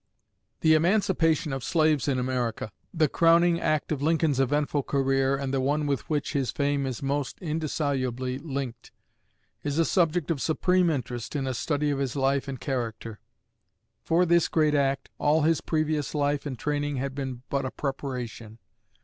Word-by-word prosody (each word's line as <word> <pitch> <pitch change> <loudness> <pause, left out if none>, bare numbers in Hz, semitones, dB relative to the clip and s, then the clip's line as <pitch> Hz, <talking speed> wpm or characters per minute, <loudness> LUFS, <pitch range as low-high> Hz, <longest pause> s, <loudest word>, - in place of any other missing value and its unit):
The 160 - +5
emancipation 165 -3 +2
of 135 -2 -4
slaves 155 -4 +2
in 135 -2 +1
America 125 -4 -2 0.2
the 160 -3 +2
crowning 170 +2 +4
act 155 -1 0
of 145 -3 -1
Lincoln's 155 -2 +2
eventful 145 +2 +1
career 135 0 +1
and 135 -1 -3
the 135 - +1
one 145 +3 +1
with 140 -2 -2
which 150 -2 -1
his 135 -4 0
fame 140 -1 0
is 130 0 -5
most 140 -1 -2
indissolubly 135 -6 -2
linked 140 -5 -5 0.7
is 145 +3 -2
a 165 - +4
subject 170 -2 +1
of 145 -5 -2
supreme 180 +2 +2
interest 125 -3 -3
in 140 -2 -1
a 130 - -1
study 145 +4 0
of 140 - -1
his 135 -2 -2
life 135 0 +1
and 135 -2 -5
character. 115 -2 -4 0.8
For 170 +2 +2
this 170 -1 +3
great 155 -2 +2
act 135 -2 +1
all 150 +1 +3
his 160 +1 +2
previous 155 -2 -1
life 145 0 0
and 130 -3 -5
training 145 +1 -1
had 135 +1 -3
been 130 -3 -5
but 140 0 0
a 130 - -2
preparation. 125 -6 -5
140 Hz, 165 wpm, -27 LUFS, 135-155 Hz, 0.8 s, The